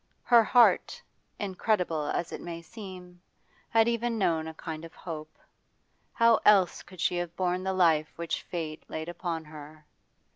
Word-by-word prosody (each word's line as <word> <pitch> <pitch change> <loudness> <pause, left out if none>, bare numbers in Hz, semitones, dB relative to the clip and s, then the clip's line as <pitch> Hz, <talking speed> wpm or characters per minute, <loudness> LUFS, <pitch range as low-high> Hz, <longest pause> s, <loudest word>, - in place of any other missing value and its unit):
Her 235 -2 +6
heart, 245 - +4 0.4
incredible 180 -6 -1
as 170 - -2
it - - -6
may 170 -1 -7
seem, 180 -3 -11 0.5
had 225 0 +4
even 235 0 0
known 165 -6 +1
a 160 - -6
kind 160 -1 -6
of 165 - -11
hope 155 -2 -8 0.8
how 230 -1 +5
else 195 -4 +4
could 185 -2 -15
she 175 +1 +1
have 175 -1 -4
borne 180 0 -1
the 190 0 -1
life 160 -4 +3
which 170 -1 -3
fate 160 -3 -5
laid 160 +1 -5
upon 170 -2 -4
her? 150 0 -12
175 Hz, 155 wpm, -28 LUFS, 160-195 Hz, 0.8 s, Her